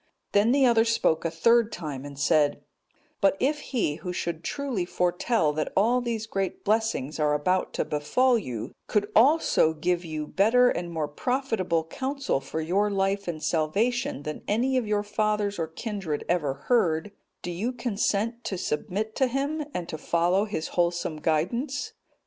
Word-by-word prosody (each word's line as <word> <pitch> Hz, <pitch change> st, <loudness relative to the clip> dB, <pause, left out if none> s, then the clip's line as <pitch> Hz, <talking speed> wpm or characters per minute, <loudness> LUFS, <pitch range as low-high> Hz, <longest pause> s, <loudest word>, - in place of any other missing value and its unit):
Then 205 Hz, +3 st, +4 dB
the 270 Hz, 0 st, +4 dB
other 230 Hz, -2 st, +5 dB
spoke 225 Hz, -8 st, +1 dB
a -, -, +2 dB
third 230 Hz, +7 st, +3 dB
time 145 Hz, -5 st, -5 dB
and 140 Hz, -1 st, -9 dB
said, 150 Hz, 0 st, +2 dB, 0.6 s
"But 195 Hz, 0 st, +4 dB
if 295 Hz, +3 st, +1 dB
he 220 Hz, -, -1 dB
who 180 Hz, -, -5 dB
should 170 Hz, -2 st, -3 dB
truly 270 Hz, -7 st, -2 dB
foretell 175 Hz, -1 st, +1 dB
that 155 Hz, +1 st, -2 dB
all 235 Hz, +5 st, +3 dB
these 230 Hz, -2 st, -2 dB
great 195 Hz, -4 st, -3 dB
blessings 215 Hz, -, 0 dB
are 150 Hz, -1 st, +2 dB
about 185 Hz, +6 st, 0 dB
to -, -, -1 dB
befall 245 Hz, -, +2 dB
you, 125 Hz, -, -4 dB, 0.2 s
could 210 Hz, 0 st, 0 dB
also 255 Hz, -, +4 dB
give 175 Hz, +3 st, 0 dB
you 155 Hz, -2 st, -4 dB
better 230 Hz, +9 st, +4 dB
and 175 Hz, 0 st, -3 dB
more 160 Hz, -3 st, -2 dB
profitable 190 Hz, -, -1 dB
counsel 270 Hz, -, -2 dB
for 160 Hz, +3 st, -4 dB
your 195 Hz, +6 st, +1 dB
life 195 Hz, 0 st, 0 dB
and 155 Hz, -3 st, -4 dB
salvation 215 Hz, -, 0 dB
than 150 Hz, 0 st, -5 dB
any 245 Hz, +6 st, +1 dB
of 250 Hz, -4 st, +1 dB
your 210 Hz, -1 st, +1 dB
fathers 210 Hz, -1 st, -1 dB
or 165 Hz, -, -1 dB
kindred 185 Hz, -3 st, -4 dB
ever 150 Hz, -6 st, 0 dB
heard, 205 Hz, -6 st, +2 dB, 0.3 s
do 175 Hz, -, -3 dB
you 205 Hz, +9 st, -2 dB
consent 230 Hz, -1 st, -1 dB
to 190 Hz, -, -2 dB
submit 195 Hz, +7 st, -3 dB
to 265 Hz, -, +3 dB
him, 280 Hz, +5 st, -1 dB
and 175 Hz, -9 st, -4 dB
to 155 Hz, -3 st, -5 dB
follow 175 Hz, +5 st, +2 dB
his 160 Hz, -7 st, -4 dB
wholesome 170 Hz, -2 st, 0 dB
guidance?" 235 Hz, -, -1 dB
195 Hz, 165 wpm, -26 LUFS, 160-235 Hz, 0.6 s, other